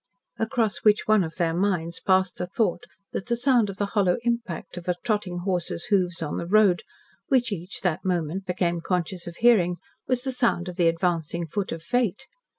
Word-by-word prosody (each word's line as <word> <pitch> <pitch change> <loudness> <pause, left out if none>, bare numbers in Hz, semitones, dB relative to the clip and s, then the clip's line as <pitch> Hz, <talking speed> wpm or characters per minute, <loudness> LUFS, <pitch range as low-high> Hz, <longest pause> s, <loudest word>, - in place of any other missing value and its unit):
Across 225 -2 0
which 210 -1 +3
one 215 -3 +4
of 160 -1 -6
their 170 -3 0
minds 170 -2 0
passed 190 -1 +2
the 180 - -3
thought 180 -2 0 0.3
that 195 - -4
the 235 -1 0
sound 240 -4 +3
of 195 - -7
the 205 - 0
hollow 195 -5 +3
impact 235 -10 -2
of 175 0 -8
a 180 - +2
trotting 205 -6 -1
horse's 180 -3 -1
hoofs 180 -4 +1
on 150 - -3
the 170 - -4
road, 200 -2 +4 0.5
which 250 -5 +2
each 185 -1 -5
that 180 0 -1
moment 180 +1 -1
became 175 -2 0
conscious 180 0 -2
of 170 - -7
hearing 200 -7 +4 0.3
was 255 -1 +1
the 265 - -1
sound 235 -8 +1
of 180 - -6
the 175 -2 +3
advancing 170 0 0
foot 195 +5 -3
of 165 0 -5
Fate? 245 0 0
185 Hz, 195 wpm, -25 LUFS, 175-215 Hz, 0.5 s, one